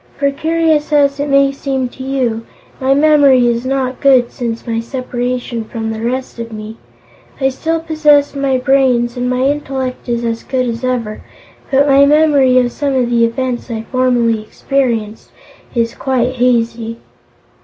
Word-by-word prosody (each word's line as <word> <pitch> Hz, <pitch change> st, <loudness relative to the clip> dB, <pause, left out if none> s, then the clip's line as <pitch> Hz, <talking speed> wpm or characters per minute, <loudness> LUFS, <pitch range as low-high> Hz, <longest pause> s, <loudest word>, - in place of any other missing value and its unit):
"For, 280 Hz, -1 st, +1 dB
curious 315 Hz, +1 st, 0 dB
as 285 Hz, -1 st, +2 dB
it 285 Hz, +1 st, -2 dB
may 275 Hz, 0 st, +4 dB
seem 270 Hz, -2 st, -2 dB
to 260 Hz, -, -13 dB
you, 255 Hz, -4 st, -1 dB, 0.4 s
my 270 Hz, +1 st, +2 dB
memory 285 Hz, -4 st, +5 dB
is 235 Hz, +1 st, -1 dB
not 260 Hz, -1 st, -2 dB
good 260 Hz, -4 st, +4 dB
since 235 Hz, -3 st, -5 dB
my 230 Hz, -2 st, -2 dB
separation 245 Hz, -1 st, -4 dB
from 225 Hz, 0 st, -5 dB
the 220 Hz, 0 st, -5 dB
rest 255 Hz, +1 st, -3 dB
of 230 Hz, 0 st, -6 dB
me. 215 Hz, +1 st, -8 dB, 0.6 s
I 265 Hz, -1 st, +2 dB
still 325 Hz, +5 st, -2 dB
possess 305 Hz, -3 st, +2 dB
my 275 Hz, -2 st, 0 dB
brains 255 Hz, -2 st, +2 dB
and 250 Hz, 0 st, -2 dB
my 250 Hz, 0 st, 0 dB
intellect 265 Hz, -3 st, -3 dB
is 235 Hz, 0 st, -1 dB
as 230 Hz, 0 st, -2 dB
good 255 Hz, -1 st, -2 dB
as 235 Hz, 0 st, -4 dB
ever, 235 Hz, -4 st, -2 dB, 0.5 s
but 275 Hz, +1 st, +3 dB
my 280 Hz, 0 st, +5 dB
memory 290 Hz, -4 st, +4 dB
of 245 Hz, -1 st, +2 dB
some 280 Hz, 0 st, -2 dB
of 245 Hz, -2 st, 0 dB
the 235 Hz, -1 st, +3 dB
events 245 Hz, +2 st, -3 dB
I 225 Hz, -1 st, -4 dB
formerly 245 Hz, -3 st, +1 dB
experienced 225 Hz, -2 st, -2 dB, 0.5 s
is 230 Hz, -1 st, 0 dB
quite 255 Hz, -1 st, -1 dB
hazy." 230 Hz, -2 st, 0 dB
255 Hz, 165 wpm, -15 LUFS, 235-275 Hz, 0.6 s, memory